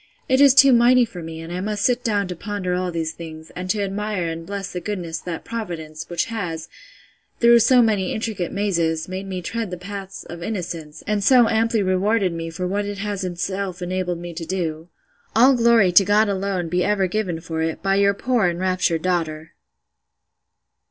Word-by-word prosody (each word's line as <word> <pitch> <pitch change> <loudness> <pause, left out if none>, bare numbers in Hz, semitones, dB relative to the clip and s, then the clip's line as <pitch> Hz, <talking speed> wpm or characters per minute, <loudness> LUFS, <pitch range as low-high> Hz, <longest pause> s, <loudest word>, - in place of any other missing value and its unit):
—It 260 +1 +3
is 275 -2 +7
too 275 -1 +8
mighty 245 +1 +5
for 195 -6 -9
me, 160 0 -7
and 165 +1 -7
I 180 - -3
must 205 0 -2
sit 245 -1 +2
down 205 -4 0
to 180 - -4
ponder 200 0 -3
all 180 0 -1
these 165 -1 -2
things, 160 -1 -10
and 185 +1 -5
to 205 +1 +1
admire 200 -3 -2
and 165 0 -6
bless 200 -1 -5
the 180 - -4
goodness 170 -4 -4
of - - -20
that 170 -2 -5
Providence, 165 -8 -6
which 175 - 0
has, 180 -8 -5 0.7
through 235 0 +7
so 245 +2 +5
many 205 -5 +1
intricate 215 -5 -3
mazes, 170 -6 0
made 190 +1 -5
me 185 -2 -5
tread 225 +3 -3
the 180 - -5
paths 195 +1 -8
of 170 0 -9
innocence, 170 -6 -5
and 210 -1 0
so 245 +1 +6
amply 225 -1 +1
rewarded 190 +1 +1
me 165 0 -4
for 180 +3 -4
what 200 +3 -1
it 205 0 -5
has 200 -1 -3
itself 185 +1 -3
enabled 180 -1 -2
me 175 0 -7
to 165 +1 -6
do! 165 -2 -3 0.5
All 255 +5 +6
glory 235 -6 +4
to 175 +3 +7
God 210 +3 +3
alone 195 -3 -1
be 180 +2 0
ever 205 -2 +1
given 185 -3 -2
for 165 -1 -4
it, 160 +2 -2
by 195 0 +2
your 200 0 +3
poor 240 -2 +1
enraptured 175 -2 0
daughter! 160 -3 -2
185 Hz, 200 wpm, -22 LUFS, 170-210 Hz, 0.7 s, too